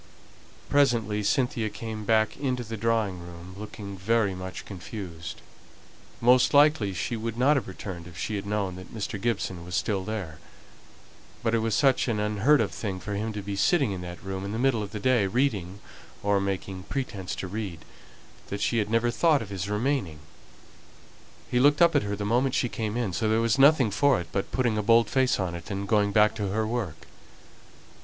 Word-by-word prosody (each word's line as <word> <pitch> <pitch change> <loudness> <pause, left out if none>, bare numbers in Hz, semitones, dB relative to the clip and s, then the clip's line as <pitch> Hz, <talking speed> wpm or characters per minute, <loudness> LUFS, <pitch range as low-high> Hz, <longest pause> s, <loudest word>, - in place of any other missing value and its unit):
Presently 115 -7 +2
Cynthia 115 +1 0
came 110 -1 -6
back 110 0 +2
into 130 -3 -2
the 115 0 -6
drawing 110 -4 0
room, 85 +1 -10
looking 100 -1 -8
very 100 +1 +1
much 95 0 -7
confused. 85 -4 -8 0.8
Most 125 +4 +4
likely 145 -8 +5
she 95 +6 -3
would 115 0 -4
not 135 +5 +4
have 140 - -1
returned 90 -2 -7
if 85 -1 -12
she 110 - -3
had 100 0 -4
known 100 -3 -1
that 95 - -11
Mr. 110 -1 -4
Gibson 95 -6 -2
was 90 +1 -5
still 100 -3 0
there; 95 -7 -5 1.0
but 115 -1 +1
it 115 - +3
was 110 0 0
such 135 -2 +3
an 110 -3 0
unheard 105 +8 +3
of - - -1
thing 95 -4 -4
for 105 +3 -5
him 110 +2 -2
to 105 -1 -5
be 100 0 -4
sitting 140 - +2
in 95 -2 -4
that 90 0 -8
room 95 0 -4
in 100 +1 -4
the - - -2
middle 125 -2 +2
of 105 - -4
the 105 0 -6
day, 120 -3 +3
reading 100 -5 -1 0.4
or 100 -1 +2
making 95 -1 -3
pretence 105 -9 -3
to 95 - -5
read, 95 -5 -5 0.6
that 100 - -4
she 115 - +1
had 105 -1 -1
never 115 +1 +2
thought 155 0 +3
of 105 - -11
his 95 0 -4
remaining. 105 - -1 1.3
He 125 - +3
looked 145 +2 +5
up 170 -2 +5
at 145 - +5
her 100 0 -3
the 105 0 -4
moment 125 +5 +1
she 125 - +1
came 110 -1 -3
in, 115 -7 -1
so 110 +5 0
there 110 +1 +3
was 115 +2 +1
nothing 135 -5 +6
for 140 0 +3
it 85 -2 -7
but 100 - -2
putting 120 -5 +1
a - - +1
bold 115 +1 +4
face 130 -4 +2
on 90 -3 -1
it, 85 +3 -8
and 100 0 -3
going 105 -1 +2
back 105 0 +4
to 105 -2 -2
her 110 +3 0
work. 110 -7 -4
105 Hz, 200 wpm, -27 LUFS, 95-120 Hz, 1.3 s, nothing